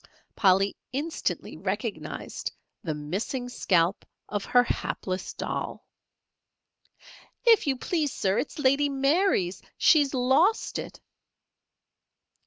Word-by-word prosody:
Polly 195 0 +3 0.2
instantly 295 +6 -3
recognized - - -4 0.3
the 160 -5 -2
missing 195 - -3
scalp 180 -5 +1 0.2
of 205 -1 -3
her 245 0 +5
hapless 185 -5 -3
doll. - - -4 1.6
"If 455 -8 +5
you 270 -2 +1
please, 305 +1 -1
Sir, 195 -3 0
it's - - -4
Lady 285 0 +3
Mary's. 275 - +1 0.2
She's 290 -4 +4
lost 275 - +2
it." - - -8
255 Hz, 95 wpm, -27 LUFS, 195-290 Hz, 1.6 s, her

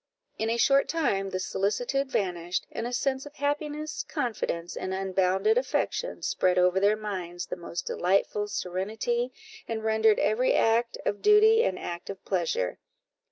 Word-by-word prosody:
In 220 - 0
a 230 - +1
short 275 +3 +4
time 200 -13 0
this 185 -1 -3
solicitude 245 +7 -1
vanished, 180 -5 -1
and 225 - -3
a - - -5
sense 265 +2 -1
of 290 - -14
happiness, 300 +1 -2
confidence, 215 - -3
and 190 0 -3
unbounded 190 - +2
affection - - -2
spread 185 0 +1
over 180 +1 +4
their 205 +2 +4
minds 185 -5 -5
the - - -5
most 170 0 -6
delightful 195 +3 +1
serenity, 215 +6 -2 0.4
and 220 -1 -3
rendered 220 -1 +3
every 220 +5 +2
act 230 +1 +2
of 205 - -1
duty 435 +2 +6
an 185 - 0
act 175 0 -6
of 195 -1 -8
pleasure. 165 - -1
215 Hz, 155 wpm, -27 LUFS, 185-265 Hz, 0.4 s, duty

